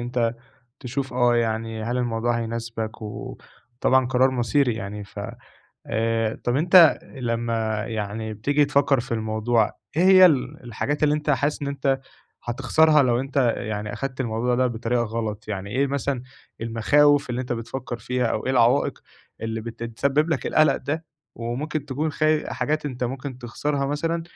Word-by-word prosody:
أنت 120 -1 -1 0.5
تشوف، 130 +1 -4
آه، 120 -1 +3
يعني 115 -1 -1
هل 120 +3 -2
الموضوع 120 -1 0
هيناسبك، 115 -1 -4
وطبعًا 120 +4 -2
قرار 130 +1 +3
مصيري 125 0 +1
يعني 105 -1 -6
ف 100 +1 -9 0.7
آآ 115 0 0
طَب 120 +2 +1
أنت 170 +1 +7 0.2
لمّا 115 -3 -1
يعني 110 0 -4
بتيجي 145 +7 +2
تفكّر 140 -2 +2
في 120 0 -7
الموضوع، 110 0 +1 0.2
إيه 170 - +3
هي 185 -1 +9
ال 135 -5 0
الحاجات 145 +6 -3
اللي 150 0 +4
أنت 150 0 -1
حاسس 145 +2 0
إن 140 - -2
أنت 135 -1 0 0.4
هتخسرها 145 +5 +3
لو 120 -1 +2
أنت 135 +1 -7 0.2
يعني 105 0 -4
أخدت 135 -1 -5
الموضوع 120 +1 0
ده 130 +1 +2
بطريقة 120 0 -1
غلط، 110 -2 -4
يعني 100 -1 -4
إيه 135 +5 +1
مثلًا 140 -2 -2 0.4
المخاوف 140 +5 +3
اللي 125 +1 -2
أنت 125 -1 -3
بتفكر 120 +1 -5
فيها، 125 +2 -1
أو 110 - -2
إيه - - +1
العوائق 125 +2 +3 0.4
اللي 115 0 -3
بت 115 +1 -8
تسبب 140 +7 0
لك 150 - -1
القلق 155 0 +4
ده، 160 +3 -4 0.3
وممكن 135 +6 -3
تكون 150 +4 -2
خ 155 - -1 0.2
حاجات 155 0 -1
أنت 125 -2 -3
ممكن 130 +1 -5
تخسرها 140 +3 -2
مثلًا، 165 +4 -1
125 Hz, 160 wpm, -24 LUFS, 115-140 Hz, 0.7 s, هي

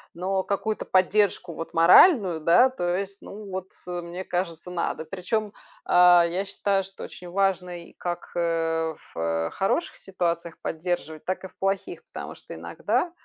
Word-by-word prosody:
Но 190 +2 0
какую-то 210 +2 -2
поддержку, 185 -2 +2
вот, 165 - -7
моральную, 180 - +7
да, 175 +12 +6
то 175 -7 -1
есть, 195 0 -5
ну, 205 0 -9
вот, 185 0 -4 0.2
э, 175 -1 -4
мне 175 +2 -6
кажется, 175 -1 -3
надо. 170 -2 -2
Причём, 200 +4 -2 0.3
а, 180 -1 +7
я 185 +4 -2
считаю, 195 0 0
что 195 +1 -10
очень 180 -1 -9
важный 180 -2 -1
как, 175 -1 -4
э, 165 -1 0 0.2
в 80 0 -1
хороших 195 - -1
ситуациях 170 -3 -3
поддерживать, 160 -2 -3
так 185 +1 -2
и - - -5
в - - -26
плохих, 195 0 -2
потому - - -7
что - - -10
иногда, 210 - -1
180 Hz, 155 wpm, -25 LUFS, 170-195 Hz, 0.3 s, моральную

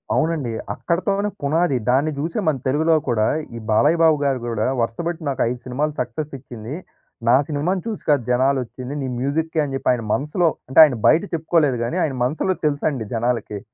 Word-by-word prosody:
అవునండి. 155 -7 0 0.2
అక్కడితోనే 195 +4 -1
పునాది. 145 0 +1
దాన్ని 140 +5 +2
చూసి 165 +3 -3
మన 155 - +3
తెలుగులో 160 +5 +3
కూడా, 110 -2 +2 0.3
ఈ 115 - -5
బాలయ్య 145 +10 +3
బాబు 160 -2 +5
గారు 135 -2 +1
కూడా, 110 -2 -1 0.2
"వరుస 115 0 -2
పెట్టి 170 -1 -4
నాకు 135 - -2
5 125 0 -4
సినిమాలు 145 +4 -1
సక్సెస్ 125 +5 -4
ఇచ్చింది. 120 0 -8 0.5
నా 120 - +6
సినిమాను 160 +5 -1
చూసి 220 - -4
కాదు 140 -5 +3
జనాలు 130 +2 +2
వచ్చింది. 125 +3 -8
నీ 135 - -3
మ్యూజిక్‌‌కే" 155 +5 -1
అని 135 - -5
చెప్పి 135 - -1
ఆయన 120 -2 -1
మనసులో, 150 +5 +1 0.2
అంటే 130 - +4
ఆయన 145 -5 +4
బయట 160 +5 +5
చెప్పుకోలేదు 160 -5 +2
కానీ, 155 +10 -2
ఆయన 145 -4 -1
మనసులో 160 +8 0
తెలుసండి 145 -4 0
జనాలకి. 115 -3 -1
140 Hz, 180 wpm, -21 LUFS, 125-160 Hz, 0.5 s, నా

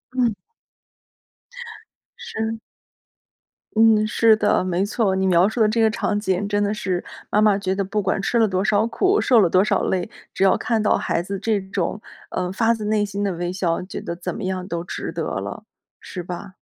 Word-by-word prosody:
嗯。 245 -3 +2 1.8
是。 220 0 -4 1.2
嗯， 220 -1 +5
是 220 0 +4
的， 215 - +2
没 185 +1 0
错。 205 -2 0
你 190 0 0
描 185 +2 +4
述 235 - -5
的 220 - +5
这 225 +2 +1
个 220 - +5
场 210 -1 -1
景 200 -1 -1
真 205 0 +1
的 205 - 0
是 185 -4 -2 0.3
妈 210 - +3
妈 210 -2 +4
觉 190 -2 -1
得 200 +1 -1
不 210 +2 -2
管 195 0 0
吃 235 +4 0
了 225 - +4
多 185 -1 0
少 215 0 +2
苦、 380 - +1
受 245 -3 +4
了 185 -5 +4
多 185 +2 +4
少 215 - +1
累， 185 0 -1 0.2
只 - - -1
要 195 - +5
看 230 -3 0
到 210 - +3
孩 170 - -1
子 195 +1 -5
这 210 +1 0
种， 190 0 -3 0.3
呃， 180 0 -2
发 225 +4 +2
自 215 -2 -6
内 210 0 +1
心 200 0 -3
的 200 - 0
微 175 +1 -3
笑， 180 -2 -1
觉 185 - -7
得 170 - -5
怎 170 - -5
么 220 - -6
样 185 -1 -3
都 170 -2 -3
值 - - -5
得 - - -3 0.2
了， - - -6 0.4
是 180 - -7
吧？ 180 +2 -7
200 Hz, 220 characters per minute, -22 LUFS, 185-220 Hz, 1.8 s, 嗯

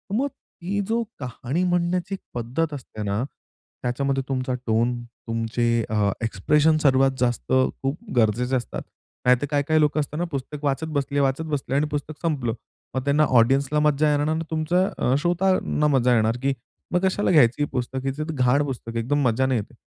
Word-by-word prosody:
मग 265 +5 +1
ती 205 -8 -6
जो 230 +1 +1 0.2
कहाणी 125 +5 -3
म्हणण्याची 175 +1 0 0.2
पद्धत 130 +7 -2
असते 120 -6 -7
ना, 100 +3 -1 0.6
त्याच्यामध्ये 135 +2 0
तुमचा 130 -1 -1
टोन, 120 +2 +1
तुमचे 115 0 -1
अ, 105 -2 +2
एक्सप्रेशन्स 150 +9 +2
सर्वात 135 -1 +4
जास्त 120 -1 -1 0.3
खूप 135 +3 -1 0.2
गरजेचे 120 +3 +2
असतात. 120 -2 -3 0.4
नाहीतर 125 +2 +4
काही, 145 -1 +2
काही 155 -1 +3
लोकं 150 0 +2
असताना 150 +3 -2
पुस्तक 140 +1 -5
वाचत 140 +3 0
बसले, 140 +1 -1
वाचत 140 +3 +1
बसले 135 -1 -3
आणि 145 +2 +3
पुस्तक 150 +1 -5
संपलं. 140 -9 -1 0.4
मग 130 - -1
त्यांना 145 +2 +3 0.2
ऑडियन्सला 135 +5 +2
मज्जा 150 0 +3
येणार 145 0 +1
न 160 +1 +1
मग 165 - -2
तुमचं 165 +4 +1
अ, 125 - +2
श्रोतांना 175 -2 +1
मज्जा 125 -3 +3
येणार 110 +1 +2
की 140 0 +2 0.4
मग 180 - +3
कशाला 190 +1 +1
घ्यायची 145 -4 +5
हे - - 0
पुस्तक? 130 +1 -3
ही 135 - +1
तर 155 +1 -3
घाण 130 +1 +3
पुस्तक 120 -4 -6
एकदम 140 +6 0
मज्जा 120 +3 +2
नाही 130 -3 +1
येते. 100 - -8
140 Hz, 175 wpm, -24 LUFS, 125-155 Hz, 0.6 s, घ्यायची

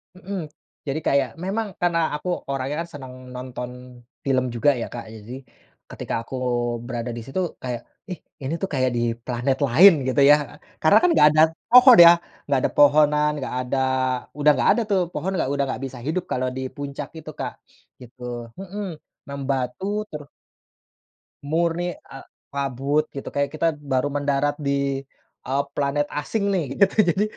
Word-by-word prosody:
Mhm. 185 -4 -6 0.4
Jadi 140 +3 -1
kayak 140 -2 +2
memang 210 +4 -2
karena 175 -1 +2 0.2
aku 150 +5 -5 0.2
orangnya 135 +1 -2
kan 170 - -13
senang 130 -3 -9 0.2
nonton 125 -1 -6 0.5
film 130 -2 +2
juga 120 +5 +3
ya - - -2
Kak, 120 -1 -6
jadi 110 +2 -11 0.6
ketika - - -6
aku 125 - -8 0.5
berada 120 -1 -4
di - - -5
situ 135 +8 -4 0.2
kayak, 125 -2 -3 0.3
ih 180 - -5 0.2
ini 135 +4 -2
tuh 195 - -2
kayak 130 -2 +2
di - - 0 0.2
planet 125 +2 -1
lain 170 +11 +8 0.2
gitu 130 +2 +2
ya. 145 - +9 0.5
Karena 155 - +6
kan 360 - +5
enggak 150 - +6
ada 155 +1 +4 0.3
pohon 250 0 +9
ya? - - +11 0.4
Nggak 140 -2 +2
ada - - +1
pohonan, 150 +1 +5
nggak 135 - -5
ada, 130 +2 -2 0.6
udah 150 0 +4
nggak - - +2
ada 240 - +2
tuh, 195 -2 +3
pohon 180 +5 -3
enggak, 165 -7 -1
udah 140 0 +1
enggak 130 -2 -4
bisa 130 -2 -8
hidup 160 +4 -1
kalau 130 0 0
di - - -3
puncak 140 -1 -6
itu 155 -1 -8
Kak, - - -3 0.5
gitu. 125 +1 -15 0.4
Mhm. 195 +1 -5 0.4
membatu 135 +2 -3 0.3
ter 150 - -6 1.2
Murni, 170 +3 -1
eee, 135 - -12 0.3
kabut 140 +2 0
gitu, 140 - -6
kayak 140 0 0
kita 155 +2 +1 0.2
baru 130 +1 +2
mendarat 145 0 0
di, 140 -1 0 0.5
eee, 135 +2 +1
planet 145 +1 0
asing 200 +8 -2
nih 180 -4 +1 0.2
gitu. 200 0 +4
Jadi 190 +5 +2
140 Hz, 165 wpm, -23 LUFS, 130-165 Hz, 1.2 s, ya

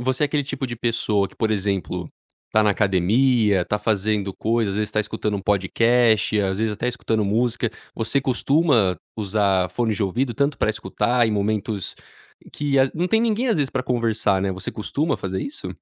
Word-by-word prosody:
você 130 +3 +1
é - - +2
aquele 145 0 0
tipo 135 -1 -4
de 120 -2 -6
pessoa 110 -4 0
que, - - -21
por 110 - 0
exemplo, 100 -2 -2 0.4
tá 110 - +3
na 105 - +3
academia, 105 +1 +2
tá 105 - -1
fazendo 105 -2 0
coisas, 115 -2 0
às 105 - -2
vezes 105 -1 -1
tá 110 - +1
escutando 105 0 -2
um 95 - -6
podcast, 110 +3 +2
às 95 -1 -1
vezes 110 0 0
até 115 +4 -2
escutando 115 -3 -1
música, 115 +2 0 0.2
você 120 +5 +1
costuma 130 - +2 0.2
usar 100 -3 +1
fones 110 +1 -1
de 110 - -1
ouvido 120 +6 -1
tanto 140 +3 0
pra 110 - +2
escutar 120 +2 0
em - - 0
momentos 105 -1 -2 0.6
que 145 -2 0
as 130 0 +4
não 175 +3 -1
tem 225 +2 +3
ninguém 235 +2 +1
às 225 - +2
vezes 145 -3 0
pra 130 - -2
conversar, 110 -6 0
né, 100 - 0
você 95 0 -5
costuma 145 +9 -1
fazer 95 0 -4
isso? 290 - -6
110 Hz, 195 wpm, -22 LUFS, 100-125 Hz, 0.6 s, as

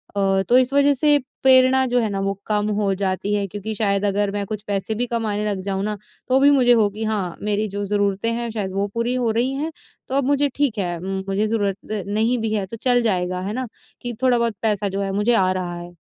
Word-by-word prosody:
अ, 195 -1 +2
तो 245 - +6
इस 255 +1 +2
वज़ह 285 0 +4
से 295 +2 +3 0.3
प्रेरणा 260 0 +5
जो 245 0 +2
है 220 -2 0
ना 195 - -3
वो 195 0 0
कम 210 0 0
हो 195 -1 +1
जाती 195 +1 -1
है। 205 -1 0
क्योंकि 205 +3 -5
शायद 200 -1 0
अगर 200 0 +1
मैं 205 0 -3
कुछ 210 0 -5
पैसे 205 +2 -2
भी 245 +3 -1
कमाने 215 -3 -2
लग 195 -2 -2
जाऊँ 195 0 -1
ना 210 0 -2 0.3
तो 260 +1 +3
भी 285 +1 +6
मुझे 255 -3 +4
हो 215 -3 +3
कि 215 +2 -6
हाँ, 205 -5 -2
मेरी 210 +1 0
जो 200 +1 -4
ज़रूरतें 205 +2 0
हैं 235 0 -3
शायद 205 -4 -3
वो 200 +1 0
पूरी 230 +1 0
हो 245 -2 0
रही 245 +4 0
हैं। 310 +3 -3 0.4
तो 265 - -3
अब 275 - +2
मुझे 285 +1 +2
ठीक 280 -7 0
है 175 -3 -2
मुझे 195 +2 -1
ज़रूरत 205 -1 -2
नहीं 220 +4 +1
भी 220 -1 -2
है 205 -3 0
तो 230 +4 -8
चल 245 -1 +3
जाएगा 185 -4 0
है 195 +3 -3
ना, 255 +1 -3 0.3
कि 240 -1 -4
थोड़ा 250 -2 +4
बहुत 230 -2 0
पैसा 210 -2 0
जो 195 +1 -3
है 195 -1 -2
मुझे 210 +4 +2
आ 185 -4 +3
रहा 180 -2 -3
है 175 0 -10
210 Hz, 245 wpm, -22 LUFS, 195-240 Hz, 0.4 s, तो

